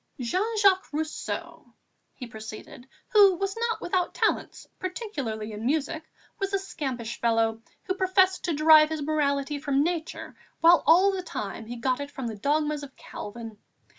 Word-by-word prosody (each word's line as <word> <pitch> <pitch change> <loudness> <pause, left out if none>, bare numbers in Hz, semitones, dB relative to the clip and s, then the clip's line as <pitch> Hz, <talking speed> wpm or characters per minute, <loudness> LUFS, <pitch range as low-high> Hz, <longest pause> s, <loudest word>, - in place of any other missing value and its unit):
"Jean 380 - -1
Jacques 390 -2 +3
Rousseau," 310 +1 -5 0.4
he 250 - -7
proceeded, 220 +2 -10 0.2
"who 400 -3 +6
was 390 +2 -2
not 460 0 -2
without 360 -1 -1
talents, - - -1
particularly 280 - -4
in 210 +1 -7
music, 300 +4 -1 0.4
was 390 0 -2
a - - +3
scampish 255 - -5
fellow 225 -1 +1 0.2
who 375 - -1
professed 375 0 +2
to 340 - 0
derive 305 0 +7
his 315 -2 -3
morality 285 -1 0
from 280 0 +1
Nature 330 -1 -4 0.2
while 340 +1 +6
all 370 +5 +6
the 380 -1 -3
time 220 - -6
he 240 - -6
got 255 +2 -1
it 285 0 -5
from 270 -3 -6
the 225 -2 -4
dogmas 295 +6 0
of 280 -2 -10
Calvin. 220 0 -9
300 Hz, 160 wpm, -26 LUFS, 240-370 Hz, 0.4 s, derive